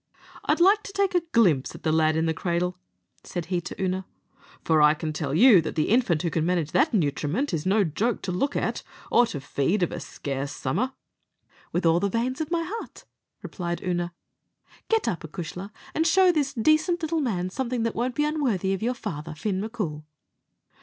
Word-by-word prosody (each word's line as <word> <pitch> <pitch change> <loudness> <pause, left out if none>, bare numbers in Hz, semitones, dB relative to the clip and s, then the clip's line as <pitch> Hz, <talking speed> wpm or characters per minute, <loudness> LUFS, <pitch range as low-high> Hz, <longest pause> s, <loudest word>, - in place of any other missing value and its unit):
"I'd - - +2
like 395 +4 +5
to 395 - -9
take 395 -1 +1
a 355 - +3
glimpse 170 - +3
at - - -12
the 160 - +1
lad 155 0 +3
in 160 +1 +1
the 160 - +1
cradle," 180 +2 -1 0.4
said 175 -3 -5
he 175 - +1
to 180 - -7
Oonagh; 185 0 -1 0.6
"for 160 -2 +3
I 150 +1 +6
can 155 0 -4
tell 145 -2 -2
you 215 -1 +7
that 160 - -5
the 155 - +1
infant 205 -9 +2
who 170 - 0
can 160 - 0
manage 170 -3 0
that 315 - +3
nutriment 175 - 0
is 165 +2 -1
no 205 +2 +4
joke 200 +8 -1
to 185 - -2
look 275 +11 -1
at, - - -1 0.3
or 240 - +5
to 150 - -5
feed 140 +8 0
of 175 - 0
a - - -4
scarce 140 0 -5
summer." 210 - -1 0.8
"With 175 +1 -1
all 165 +1 +4
the 200 +2 0
veins 245 +7 -1
of 310 - -3
my 335 -1 0
heart," 450 +5 -7 0.4
replied 175 -2 -4
Oonagh; 175 -1 -1 0.8
"get 450 -1 +2
up, 170 - 0
acushla, 175 +4 -6 0.2
and 320 +1 +1
show 370 +2 +5
this 290 -4 -1
decent 310 - +2
little 320 0 0
man 185 -8 -1
something 250 0 -2
that 230 - 0
won't 245 +2 -2
be 295 - +2
unworthy 250 - 0
of 195 - -3
your 245 +3 0
father, 155 -6 -6
Fin 190 +3 -2
M'Coul." 205 -9 -4
190 Hz, 200 wpm, -26 LUFS, 165-260 Hz, 0.8 s, you